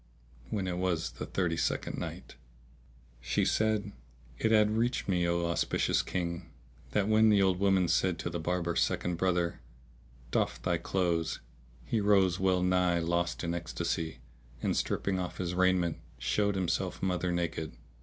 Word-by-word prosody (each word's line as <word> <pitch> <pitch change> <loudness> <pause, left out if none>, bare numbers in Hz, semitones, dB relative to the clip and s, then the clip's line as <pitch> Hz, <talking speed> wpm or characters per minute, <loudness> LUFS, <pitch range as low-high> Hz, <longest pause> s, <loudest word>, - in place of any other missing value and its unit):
When 100 -3 -2
it 90 -1 -2
was 90 -3 0
the - - -7
Thirty 85 -3 -1
second - - -1
Night, - - -6 0.9
She - - 0
said, 110 -1 +1 0.5
It 110 - +2
hath 105 -1 +5
reached 115 +3 0
me, 90 -3 +1
O 85 0 +1
auspicious 85 0 +1
King, 85 -1 -3 0.4
that 105 -1 +1
when 110 0 +5
the 100 -2 +5
old 95 -1 +2
woman 95 -2 +3
said 90 0 +2
to - - -3
the 85 - -3
Barber's 85 +1 0
second 90 -1 0
brother, 90 -2 +1 0.7
"Doff - - 0
thy 85 -2 0
clothes," 85 -2 0 0.5
he 110 - 0
rose, 95 -3 +3
well 95 -1 +2
nigh 90 -1 +3
lost 85 +1 -1
in 85 0 -1
ecstasy; 80 -1 -3 0.4
and, - - 0
stripping 95 -1 0
off 90 -1 -4
his 90 -1 -2
raiment, 90 -2 +2 0.2
showed 100 +12 +1
himself 90 -2 -1
mother 90 -1 0
naked. 85 -3 -2
90 Hz, 155 wpm, -31 LUFS, 85-95 Hz, 0.9 s, hath